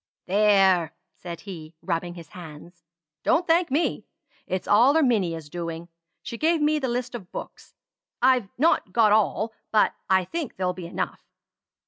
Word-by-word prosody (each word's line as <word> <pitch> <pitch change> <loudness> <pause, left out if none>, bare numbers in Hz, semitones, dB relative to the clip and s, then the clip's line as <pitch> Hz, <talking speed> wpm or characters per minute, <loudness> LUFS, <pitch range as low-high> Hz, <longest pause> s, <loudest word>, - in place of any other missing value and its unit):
"There!" 190 -4 +3 0.2
said 170 -2 -8
he, 170 -5 -9
rubbing 175 +1 -2
his 165 -3 -11
hands. 170 0 -12 0.4
"Don't 345 +2 +2
thank 335 0 +3
me. 295 +6 -1 0.4
It's 185 -1 -3
all 245 +9 +5
Erminia's 190 - +1
doing. 170 +1 -6 0.3
She 235 - -7
gave 325 +1 +2
me 300 +1 +2
the 265 - -2
list 245 +1 -3
of 210 -7 -8
books. - - -9 0.4
I've 250 -5 +3
not 315 +6 +2
got 220 -3 +4
all; 220 +1 +2 0.2
but 215 - +3 0.2
I 190 -1 +3
think 325 - -5
they'll 180 -1 0
be 180 -2 -8
enough. - - -4
200 Hz, 150 wpm, -25 LUFS, 175-255 Hz, 0.4 s, all